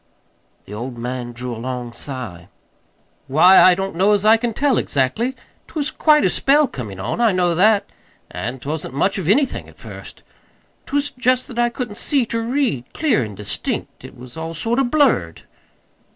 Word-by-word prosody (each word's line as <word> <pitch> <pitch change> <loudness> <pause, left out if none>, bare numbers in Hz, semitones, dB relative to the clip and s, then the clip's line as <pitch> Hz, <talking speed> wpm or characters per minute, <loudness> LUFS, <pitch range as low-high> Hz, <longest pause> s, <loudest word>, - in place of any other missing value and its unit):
The 105 - -10
old 120 +3 -6
man 120 0 -4
drew 120 0 -6
a 115 - -8
long 125 -1 -5
sigh. 120 -10 -6 0.8
"Why, 170 +8 +6
I 185 - +7
don't 195 -1 -4
know 195 +4 +3
as 205 0 +1
I 220 +1 +7
can 235 +1 -1
tell, 275 +2 +1
exactly. 145 - 0 0.3
'T - - -18
was 300 -1 -1
quite 300 -1 +4
a - - +4
spell 290 +2 +3
comin' 105 - -7
on 120 - -3
I 230 -2 +4
know 180 -2 +1
that; 200 +3 +3 0.5
and't 125 +4 -5
wasn't 150 -2 -4
much 195 +7 +1
of 175 -2 -3
anything 265 +5 +1
at - - -19
first. - - -11 0.6
'T - - -4
was 285 0 +1
just 255 0 0
that 240 -2 -5
I 240 0 +3
couldn't 235 -3 -6
see 275 -4 +1
ter 230 0 -3
read 230 - -1
clear 295 - +2
an' 105 -2 -7
distinct. 105 0 -4
It - - -12
was 125 0 -12
all 165 +1 -5
sort 230 - 0
of 265 -3 +1
blurred." 240 - +1
185 Hz, 190 wpm, -20 LUFS, -, 0.8 s, I